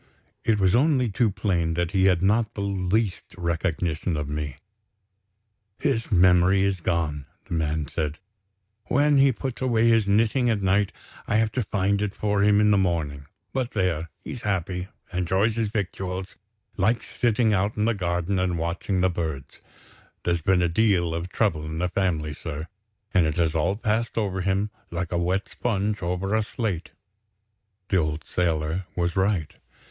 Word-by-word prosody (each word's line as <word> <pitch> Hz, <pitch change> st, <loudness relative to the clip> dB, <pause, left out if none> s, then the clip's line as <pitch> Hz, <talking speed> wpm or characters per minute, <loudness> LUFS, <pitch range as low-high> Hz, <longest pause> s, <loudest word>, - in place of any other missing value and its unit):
It 110 Hz, -2 st, +2 dB
was 95 Hz, -2 st, +3 dB
only 130 Hz, -3 st, +3 dB
too 115 Hz, +3 st, +2 dB
plain 85 Hz, -5 st, 0 dB
that 85 Hz, 0 st, -1 dB
he 95 Hz, -1 st, +3 dB
had 90 Hz, -2 st, +3 dB
not 110 Hz, +2 st, +2 dB
the 100 Hz, -, -3 dB
least 100 Hz, 0 st, -1 dB
recollection 85 Hz, -1 st, -1 dB
of 75 Hz, -1 st, -3 dB
me. 75 Hz, -2 st, -3 dB, 1.2 s
"His 135 Hz, -6 st, -1 dB
memory 90 Hz, +1 st, +5 dB
is 100 Hz, -1 st, 0 dB
gone," 75 Hz, -5 st, -1 dB, 0.2 s
the -, -, -7 dB
man 80 Hz, -2 st, -1 dB
said. 75 Hz, 0 st, -3 dB, 0.7 s
"When 145 Hz, +1 st, +3 dB
he 135 Hz, 0 st, +6 dB
puts 130 Hz, +1 st, -5 dB
away 115 Hz, -3 st, +3 dB
his 115 Hz, -3 st, +3 dB
knitting, 115 Hz, +5 st, +3 dB
at 105 Hz, -4 st, 0 dB
night, 95 Hz, +1 st, +2 dB, 0.4 s
I -, -, 0 dB
have 110 Hz, 0 st, +2 dB
to 125 Hz, -, -1 dB
find 100 Hz, 0 st, 0 dB
it 105 Hz, -2 st, -2 dB
for 105 Hz, -1 st, 0 dB
him 105 Hz, 0 st, +5 dB
in 105 Hz, 0 st, +4 dB
the 100 Hz, -, +4 dB
morning. 75 Hz, -6 st, -1 dB, 0.3 s
But, 130 Hz, -2 st, -2 dB
there! 85 Hz, -5 st, 0 dB
he's 120 Hz, -, -6 dB
happy 95 Hz, -3 st, -2 dB, 0.3 s
enjoys 95 Hz, +5 st, +1 dB
his 115 Hz, -1 st, 0 dB
victuals, 95 Hz, -2 st, -4 dB, 0.4 s
likes 110 Hz, +5 st, +1 dB
sitting 115 Hz, -2 st, +1 dB
out 100 Hz, +2 st, 0 dB
in 105 Hz, -, +2 dB
the 115 Hz, -, +2 dB
garden 90 Hz, -1 st, -1 dB
and 90 Hz, -2 st, 0 dB
watching 85 Hz, +3 st, -1 dB
the 95 Hz, -, +4 dB
birds. 80 Hz, -6 st, -5 dB, 0.6 s
There's 85 Hz, -1 st, 0 dB
been 90 Hz, +2 st, +3 dB
a -, -, +3 dB
deal 85 Hz, -2 st, +2 dB
of 85 Hz, +2 st, -3 dB
trouble 95 Hz, -7 st, 0 dB
in 80 Hz, 0 st, -5 dB
the 90 Hz, +2 st, 0 dB
family, 85 Hz, -5 st, -1 dB
sir; 80 Hz, 0 st, -6 dB, 0.5 s
and 90 Hz, -3 st, +4 dB
it 75 Hz, -, -1 dB
has 85 Hz, -3 st, +1 dB
all 85 Hz, +4 st, +1 dB
passed 110 Hz, +2 st, -1 dB
over 95 Hz, -4 st, 0 dB
him 100 Hz, +3 st, 0 dB, 0.2 s
like 85 Hz, 0 st, -3 dB
a 85 Hz, -, 0 dB
wet 95 Hz, +3 st, 0 dB
sponge 105 Hz, -2 st, -1 dB
over 90 Hz, +3 st, -1 dB
a 110 Hz, -, +3 dB
slate." 105 Hz, -5 st, -3 dB, 1.0 s
The 95 Hz, -, +3 dB
old 75 Hz, -3 st, -1 dB
sailor 85 Hz, +2 st, -1 dB
was 85 Hz, -1 st, 0 dB
right. 95 Hz, -5 st, 0 dB
95 Hz, 170 wpm, -25 LUFS, 85-105 Hz, 1.2 s, he